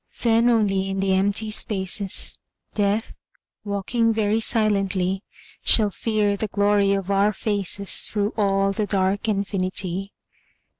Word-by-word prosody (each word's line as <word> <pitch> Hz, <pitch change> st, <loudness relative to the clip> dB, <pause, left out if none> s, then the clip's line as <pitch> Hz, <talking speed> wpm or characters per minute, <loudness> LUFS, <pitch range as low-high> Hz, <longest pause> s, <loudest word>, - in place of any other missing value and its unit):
Then 230 Hz, 0 st, +3 dB
only 195 Hz, -4 st, +1 dB
in 195 Hz, 0 st, -3 dB
the 195 Hz, 0 st, +1 dB
empty 205 Hz, +3 st, 0 dB
spaces, 195 Hz, -2 st, +1 dB, 0.4 s
Death, 205 Hz, +2 st, -1 dB, 0.4 s
walking 210 Hz, +3 st, -1 dB
very 215 Hz, 0 st, 0 dB
silently, 195 Hz, -4 st, +1 dB, 0.4 s
Shall 210 Hz, -3 st, +3 dB
fear 210 Hz, -1 st, -1 dB
the 215 Hz, +2 st, -3 dB
glory 205 Hz, 0 st, +2 dB
of 195 Hz, 0 st, -3 dB
our 200 Hz, +1 st, +2 dB
faces 200 Hz, -1 st, 0 dB
Through 205 Hz, 0 st, -2 dB
all 195 Hz, -2 st, +1 dB
the 210 Hz, +1 st, -2 dB
dark 195 Hz, +2 st, 0 dB
infinity. 195 Hz, -1 st, -2 dB
200 Hz, 120 wpm, -22 LUFS, 195-215 Hz, 0.4 s, Then